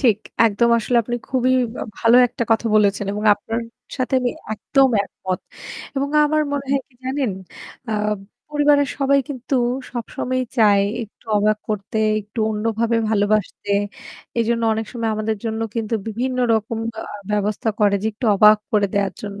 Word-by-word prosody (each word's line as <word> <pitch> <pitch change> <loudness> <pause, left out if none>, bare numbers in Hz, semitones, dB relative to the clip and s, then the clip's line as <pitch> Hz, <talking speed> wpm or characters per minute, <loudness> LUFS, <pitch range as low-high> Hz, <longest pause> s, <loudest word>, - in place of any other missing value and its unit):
ঠিক, 230 -7 +3 0.3
একদম 230 +3 +2
আসলে 240 +2 0
আপনি 240 +2 -3
খুবই 255 -1 +2 0.3
আ - - -3
ভালো 230 +1 +5
একটা 235 - -4
কথা 225 +1 +2
বলেছেন। 205 -1 +3
এবং 210 +1 -4
আপনার 225 +3 -4 0.4
সাথে 255 +1 -1
আমি 245 -1 0 0.2
একদম 270 +5 +2
একমত। 185 -2 -5 0.6
এবং 280 +1 0 0.2
আমার 305 +1 +2
মনে 280 -1 -2
হয় 275 - +2
কি 250 - -30
জানেন? 260 -3 -1 0.6
আ - - -1 0.6
পরিবারের 290 -1 +3
সবাই 280 0 +3
কিন্তু 265 -1 -4 0.4
সবসময়ই 255 +2 -2
চায় 205 -3 +5 0.2
একটু 220 - -13
অবাক 210 +1 +2
করতে 210 +1 -3 0.2
একটু 210 +3 -12
অন্যভাবে 225 +2 0
ভালোবাসতে। 205 -1 0 0.7
এজন্য 230 0 +1
অনেক 220 0 -3
সময় 230 -3 -2
আমাদের 215 0 -1
জন্য 220 0 -2
কিন্তু 225 -1 -2
বিভিন্ন 250 +4 -2 0.2
রকম 220 +1 -2 0.2
আ - - -3 0.3
ব্যবস্থা 210 +1 -1
করে 205 -1 +4
যে - - 0
একটু 230 +3 -4
অবাক 210 +1 +7
করে 205 -1 +3
দেয়ার 200 -2 +1
জন্য। 205 -1 -6
225 Hz, 160 wpm, -21 LUFS, 210-255 Hz, 0.7 s, অবাক